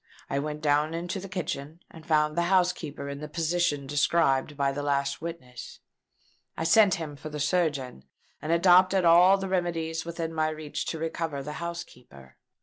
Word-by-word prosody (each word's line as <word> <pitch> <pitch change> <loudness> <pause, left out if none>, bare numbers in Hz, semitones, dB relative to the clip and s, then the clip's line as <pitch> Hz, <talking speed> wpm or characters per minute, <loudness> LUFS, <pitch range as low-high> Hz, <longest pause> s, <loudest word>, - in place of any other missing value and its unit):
I 140 - 0
went 150 +1 -4
down 150 +1 +1
into 175 +3 -4
the 195 +1 -9
kitchen, 165 -4 -5
and 160 - -13
found 150 -1 +2
the 170 - +2
housekeeper 180 -6 0
in 140 0 -6
the 150 - -6
position 160 -2 0
described 145 0 +1
by 140 -1 +1
the 140 +1 -4
last 140 0 -1
witness. 145 -7 -8 0.8
I - - -2
sent 195 +4 +5
him 160 -5 -6
for 155 +2 -8
a 150 0 -6
surgeon, 145 - -1 0.4
and 155 +2 -3
adopted 185 +2 +5
all 175 +3 +7
the 195 0 -4
remedies 165 -3 -2
within 165 -1 -5
my 155 -1 +1
reach 155 -1 -5
to 165 - -3
recover 160 -3 -3
the 150 +2 -6
housekeeper. 125 - -9
160 Hz, 170 wpm, -27 LUFS, 145-170 Hz, 0.8 s, all